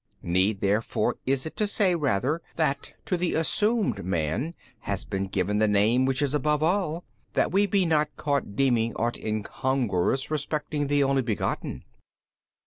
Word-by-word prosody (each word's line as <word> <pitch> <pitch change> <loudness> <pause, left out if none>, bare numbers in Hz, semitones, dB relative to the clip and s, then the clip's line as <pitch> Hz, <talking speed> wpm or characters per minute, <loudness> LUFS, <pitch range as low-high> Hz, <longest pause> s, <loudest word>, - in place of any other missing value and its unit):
need 95 +4 +1
therefore 110 +3 +1
is 135 +1 +1
it 160 - -6
to 210 - +1
say 200 -2 +2
rather 145 - 0
that 145 -4 -1
to 185 - 0
the 175 0 0
assumed 210 - +1
man 90 - -1 0.2
has 100 -4 -4
been 95 -1 -2
given 100 +2 0
the 110 - +4
Name 105 +5 +3
which 135 +2 +1
is 140 -1 0
above 150 +1 +1
all, 175 -1 0 0.3
that - - +1
we 200 +3 +3
be 195 -1 +2
not 155 -2 +2
caught 140 -8 -1
deeming 120 -3 +2
ought 120 +1 -1
incongruous 120 - -1
respecting 150 -1 -2
the 145 0 +3
Only 135 0 +2
Begotten. 115 -4 -3
135 Hz, 155 wpm, -26 LUFS, 105-155 Hz, 0.3 s, the